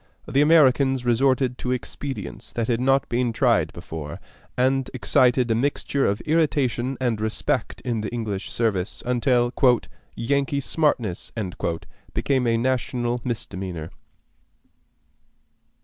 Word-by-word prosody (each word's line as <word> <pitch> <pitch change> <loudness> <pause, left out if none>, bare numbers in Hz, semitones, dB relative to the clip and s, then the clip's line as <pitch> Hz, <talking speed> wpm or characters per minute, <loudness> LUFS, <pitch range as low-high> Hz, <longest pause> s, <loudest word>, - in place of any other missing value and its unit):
The 140 - +2
Americans 135 -4 +4
resorted 125 +1 +2
to 125 - -3
expedients 135 +2 -5
that 115 -1 -1
had 120 -1 0
not 135 +1 +3
been 120 0 0
tried - - +2
before, 75 -2 -7 0.4
and 130 +1 +2
excited 125 -1 +3
a - - +5
mixture 140 +3 0
of 100 +1 -1
irritation 135 -5 +1
and 120 -4 0
respect 110 0 -1
in 115 -3 -2
the 105 - -3
English 110 -4 -3
service, 105 -5 -1
until 120 0 +2 0.6
"Yankee 140 +4 0
smartness" 130 - -1 0.8
became 130 -3 +1
a 115 0 +3
national 120 -1 -1
misdemeanor. 95 -8 -5
125 Hz, 115 wpm, -24 LUFS, 115-135 Hz, 0.8 s, a